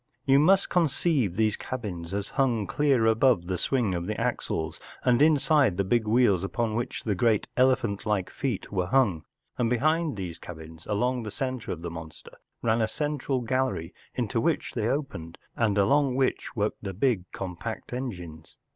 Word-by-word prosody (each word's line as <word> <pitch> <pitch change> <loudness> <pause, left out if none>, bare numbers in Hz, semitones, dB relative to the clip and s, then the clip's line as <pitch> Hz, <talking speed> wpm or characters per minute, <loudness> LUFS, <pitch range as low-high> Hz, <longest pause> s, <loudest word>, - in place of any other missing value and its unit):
You 135 0 +5
must 190 +6 +4
conceive 150 - +1
these 110 0 +2
cabins 95 -9 -5
as 100 +1 -3
hung 125 -7 +1
clear 135 -1 +2
above 115 -4 +3
the 90 +1 -2
swing 120 -8 +1
of 85 0 -3
the 110 - -3
axles, 80 -1 -2 0.2
and 125 0 +3
inside 150 - +4
the 100 - +2
big 110 +3 +1
wheels 105 -5 +3
upon 110 +2 -1
which 120 +2 -3
the 105 - 0
great 110 +1 +2
elephant 125 -5 +2
1 105 -1 +2
ike 95 -1 -6
feet 125 -8 -3
were 90 -3 0
hung, 110 -11 +2 0.3
and 120 -2 +2
behind 155 +3 +1
these 90 -4 -5
cabins 80 -1 -10
along 125 +4 0
the 110 - -5
centre 130 +2 -3
of 85 -1 -5
the 85 - -4
monster 80 -2 -10 0.3
ran 115 0 +2
a 110 - +2
central 145 -1 -2
gallery 125 -8 -1 0.2
into 120 -2 -1
which 165 +5 0
they 110 -3 -1
opened, 125 - -3 0.2
and 105 -4 +1
along 135 +5 +3
which 130 0 -1
worked 105 -1 -1
the 95 -3 -5
big 105 -4 0
compact 95 +6 -6
engines. 90 -11 -6
115 Hz, 175 wpm, -27 LUFS, 95-130 Hz, 0.3 s, You